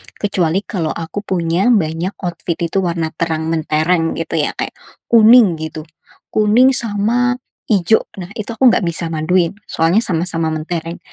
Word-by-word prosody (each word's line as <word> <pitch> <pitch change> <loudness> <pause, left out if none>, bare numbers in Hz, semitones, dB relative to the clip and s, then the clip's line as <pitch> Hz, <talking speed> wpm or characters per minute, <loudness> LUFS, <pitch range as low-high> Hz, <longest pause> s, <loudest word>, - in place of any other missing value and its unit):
kecuali 190 -2 0
kalau 175 -8 -3
aku 165 +4 -5
punya 180 -1 -1
banyak 180 -4 +1
outfit 175 -1 -3
itu 170 +3 -1
warna 170 -3 -2
terang 160 -1 -1
mentereng, 165 +1 0
gitu, 165 0 -3
ya, 150 - -1
kayak - - -3 0.4
kuning, 225 -6 +6
gitu, 160 0 -6 0.5
kuning 220 +5 +4
sama 240 +1 0 0.3
hijau. 210 0 +3 0.2
Nah, 180 +1 -8
itu 215 - -5
aku 250 +1 +5
enggak 210 - +1
bisa 165 0 -3
maduin, 165 +2 +1 0.2
soalnya 165 +6 +2
sama-sama 165 -3 0
mentereng. 165 +2 -4
175 Hz, 145 wpm, -17 LUFS, 165-205 Hz, 0.5 s, kuning